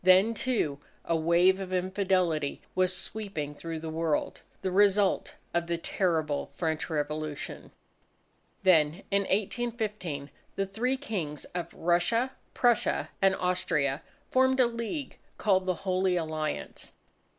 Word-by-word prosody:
Then, 185 +5 +6
too, 215 - 0 0.3
a 165 - +1
wave 170 +4 +4
of 190 -1 -5
infidelity 185 -5 0
was 185 0 +2
sweeping 190 -8 -4
through 165 +2 -5
the 160 0 -5
world, 160 -1 -1 0.2
the 190 - 0
result 200 0 +3 0.2
of 170 0 0
the 170 0 0
terrible 160 -4 0
French 160 -1 -1
Revolution. 150 -1 -3 0.9
Then, 165 -1 +4
in 200 0 +4
1815, 210 - -2 0.2
the 195 - 0
three 240 +7 -1
Kings 180 - -4
of 175 -1 -3
Russia, 175 +9 +2 0.2
Prussia, 240 -2 +2
and 195 0 +5
Austria, 150 -6 0 0.3
formed 260 0 +4
a 255 - +7
league 235 +5 -4 0.2
called 190 -3 +2
the 185 - +2
Holy 185 0 +2
Alliance. 155 -2 -3
185 Hz, 125 wpm, -29 LUFS, 160-205 Hz, 0.9 s, a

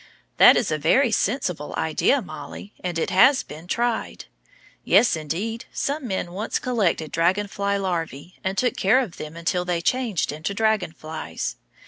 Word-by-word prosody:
That - - +8
is 205 - 0
a 155 - 0
very 235 - +3
sensible 185 - -1
idea, 190 - +1
Mollie, 205 - -9
and 175 -2 -2
it 165 - -1
has 255 +9 +5
been 160 +3 -11
tried. 235 +3 -2 0.6
Yes, 240 - +4
indeed; 185 - -4
some 285 -1 -2
men 190 -4 -3
once 205 +5 -2
collected 195 - 0
dragon 180 +5 +2
fly 200 0 -1
larvæ, 175 -4 -3
and 190 +1 -2
took 250 +5 +1
care 200 +7 +4
of 230 -10 -4
them 155 +1 -7
until 180 +2 -1
they 180 -1 -1
changed 220 - 0
into 155 +7 -4
dragon 220 -5 +1
flies. 155 0 -6
190 Hz, 160 wpm, -23 LUFS, 165-225 Hz, 0.6 s, That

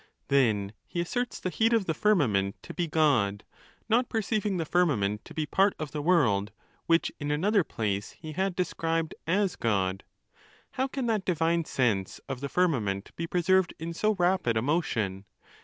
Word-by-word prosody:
Then 110 -7 +2
he 175 - -4
asserts 245 +8 -2
the 185 - -3
heat 225 +8 +2
of 225 -4 +2
the 160 - 0
firmament 125 - +2
to - - -8
be 175 -2 -1
God; 125 -11 +2 0.4
not 235 +3 +2
perceiving 215 -2 -1
the 165 - -1
firmament 115 - +1
to - - -12
be 155 - -1
part 195 +6 +2
of 155 -2 -5
the 150 - -3
world, 125 - +2 0.4
which 165 0 +3
in 145 -1 -3
another 195 +7 +2
place 105 -7 -3
he 155 -1 -9
had 190 +3 -1
described 165 -3 -1
as 190 +2 +1
God. 95 -4 0 0.7
How 260 +1 -1
can 270 -1 -3
that 220 -4 0
divine 170 -2 +1
sense 110 -10 0
of 135 -2 -4
the 140 - -3
firmament 115 - 0
be 165 - -4
preserved 180 +1 +2
in 165 +1 -5
so 215 +5 +1
rapid 175 - +1
a - - +2
motion 115 - -1
165 Hz, 175 wpm, -28 LUFS, 115-185 Hz, 0.7 s, which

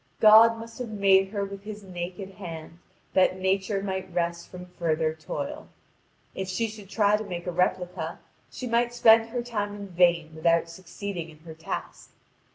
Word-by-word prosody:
God 225 +1 +8
must 230 +1 -10
have 245 -2 -4
made 195 -2 +4
her 200 0 -3
with 195 0 -8
His 210 0 -8
naked 185 +1 -6
hand 165 -3 -9 0.3
that 185 0 +3
Nature 190 +1 0
might 190 -1 -4
rest 170 0 -2
from 180 0 -9
further 160 -3 -1
toil. 285 - -6 0.7
If 190 - -4
she 210 +5 -1
should 210 -3 -11
try 205 -1 +3
to 215 - -5
make 175 -4 -6
a 180 - -2
replica, 180 0 -1 0.3
she 255 - -7
might 240 0 +1
spend 225 -1 +6
her 240 +1 -3
time 205 -4 -3
in 200 -1 -8
vain 170 -2 +3
without 165 +1 +2
succeeding 180 0 -6
in 155 - -15
her 160 0 -10
task. 160 +1 -6
190 Hz, 170 wpm, -27 LUFS, 175-215 Hz, 0.7 s, God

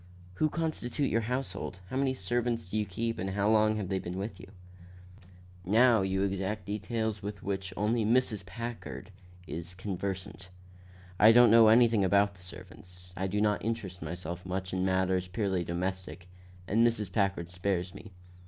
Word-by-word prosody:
"Who 155 - +3
constitute 150 -4 -2
your 115 - +2
household? 110 -6 -4
How - - -4
many 135 0 +1
servants 115 +2 -1
do 100 - -5
you 105 - -1
keep 115 +4 -3
and 95 - -2
how 100 +2 +1
long 110 0 +4
have 105 -3 -3
they 95 0 -1
been 90 0 -6
with 100 -1 -5
you?" 95 - -11 1.2
"Now 115 +3 +5
you 95 0 0
exact 100 +1 -2
details 110 +1 -2
with 100 0 -6
which 95 -1 -3
only 110 +2 +1
Mrs. 110 -2 +1
Packard 115 -2 -7 0.3
is 85 +3 -6
conversant. 95 0 -5 0.7
I 110 +2 +8
don't 120 -1 +7
know 115 -1 +8
anything 115 -2 +5
about 100 +2 +3
the 95 - -20
servants. 90 0 -12
I 95 +2 -2
do 105 +2 -1
not 105 -1 +1
interest 105 -5 -4
myself 85 +2 -6
much 95 0 -4
in 95 0 0
matters 95 -1 +1
purely 95 -2 -1
domestic, 90 0 -4 0.4
and 110 +4 +3
Mrs. 115 -5 +1
Packard 95 -4 0
spares 90 -1 -2
me. 105 - -11
100 Hz, 165 wpm, -30 LUFS, 95-110 Hz, 1.2 s, I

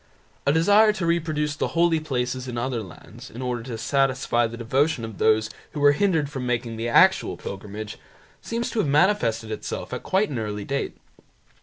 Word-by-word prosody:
A - - +6
desire 205 +7 +5
to 195 -5 -3
reproduce 155 -3 0
the 155 - -3
holy 170 -1 +4
places 130 -4 -3
in 120 -1 -5
other 120 -1 -2
lands, 95 -5 -12
in 115 - -10
order 125 -2 -2
to 115 -1 -6
satisfy 130 -2 +1
the 115 +1 -8
devotion 130 +2 0
of 110 -2 -9
those 110 0 +3 0.3
who 150 - -4
were 145 0 +6
hindered 160 -1 +1
from 135 -2 -5
making 120 -1 -1
the 115 +1 -3
actual - - +4
pilgrimage, 105 +2 -7 0.4
seems 235 +1 -3
to 230 - -2
have 185 - +1
manifested 140 - +2
itself 110 - -5
at - - -4
quite 190 -2 +1
an 125 - -2
early 105 -2 -4
date. 140 0 -3
130 Hz, 185 wpm, -24 LUFS, 115-160 Hz, 0.4 s, A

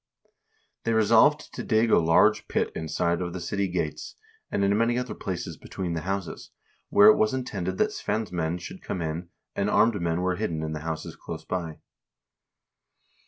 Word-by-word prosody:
They 115 - 0
resolved 115 +7 +4
to - - -5
dig 110 0 +2
a - - +6
large 80 0 +4
pit - - 0
inside 85 +2 -1
of 85 -1 -3
the 95 - -4
city 100 +2 -1
gates, 85 -4 -3 0.3
and 100 - 0
in 100 +1 +3
many 115 +2 +2
other 125 0 -3
places 85 -3 -5
between 90 -3 -5
the 80 - -2
houses, 95 0 -4 0.4
where 105 - +7
it 110 - +6
was 110 +4 +2
intended 95 -8 -3
that - - +2
Svein's 110 -3 -3
men 85 -1 -1
should 85 - -9
come 90 - -4
in, 80 +2 -4 0.3
and 100 +1 0
armed 110 -3 +3
men 85 0 0
were 90 -1 0
hidden 85 -7 -2
in 80 0 -3
the 75 - -4
houses 80 +1 -5
close - - -8
by. 85 -4 -4
90 Hz, 180 wpm, -26 LUFS, 85-110 Hz, 0.4 s, where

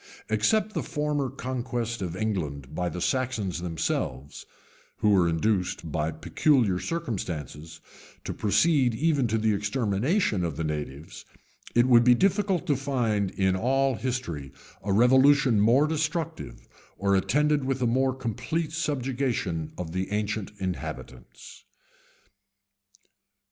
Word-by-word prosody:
Except 210 - +2
the - - -1
former 150 -3 -1
conquest 120 -3 -4
of 90 -2 -3
England 75 -10 -3
by 90 +2 -1
the 90 - -6
Saxons 110 -5 -1
themselves, 75 -5 -3 0.5
who 105 - +2
were 90 -4 +4
induced, 90 -1 -1
by 75 +1 0
peculiar 100 - +1
circumstances, 85 - -5 0.4
to - - -4
proceed 130 +2 +2
even 145 -1 +1
to 110 0 0
the 110 0 +2
extermination 105 - 0
of 80 -4 -3
the 80 - -2
natives, 75 +2 -5 0.5
it 120 +1 +5
would 120 -2 +6
be 125 0 +6
difficult 195 - +1
to 150 -5 +2
find 120 -7 0
in 95 -1 +1
all 135 +6 +1
history 110 - -4 0.3
a 100 - -3
revolution 130 +2 +5
more 120 +7 +5
destructive, 160 - -3 0.3
or 100 0 +2
attended 150 +8 +2
with 135 0 -1
a 125 - +1
more 130 +2 +1
complete 150 +6 -3
subjection 130 - -2
of 85 -3 -5
the 95 +2 -3
ancient 105 -1 -2
inhabitants. 90 -9 -7
115 Hz, 125 wpm, -27 LUFS, 90-135 Hz, 0.5 s, would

